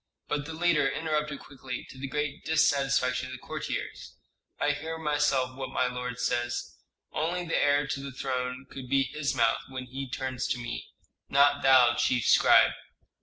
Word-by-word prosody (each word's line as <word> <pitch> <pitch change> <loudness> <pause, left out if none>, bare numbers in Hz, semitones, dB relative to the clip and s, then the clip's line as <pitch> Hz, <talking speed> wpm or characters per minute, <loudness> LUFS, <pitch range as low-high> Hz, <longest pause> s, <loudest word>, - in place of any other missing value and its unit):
But 145 0 -2
the 160 - -6
leader 165 -4 +3
interrupted 150 -1 -2
quickly, 130 -3 -7
to 130 - -13
the 135 - -4
great 150 +1 -3
dissatisfaction 135 -5 +2
of 130 - -8
the - - -6
courtiers, - - -5 0.4
"I 150 - +2
hear 160 +3 -4
myself 145 -4 +1
what 130 -1 -5
my 130 - +1
lord 125 -1 -4
says. 120 0 -2 0.4
Only 175 +3 -1
the 165 - 0
heir 145 0 +3
to 135 0 -3
the 140 0 -6
throne 130 0 -3
could 135 -3 -9
be 135 0 +3
his 140 +1 -2
mouth 115 -2 +3
when 130 -1 -6
he 135 +1 -6
turns 130 -1 -3
to - - -1
me; 120 -1 -5 0.4
not 140 +1 +4
thou, 130 -3 +6
chief 125 -2 +1
scribe." - - +6
135 Hz, 170 wpm, -28 LUFS, 125-145 Hz, 0.4 s, thou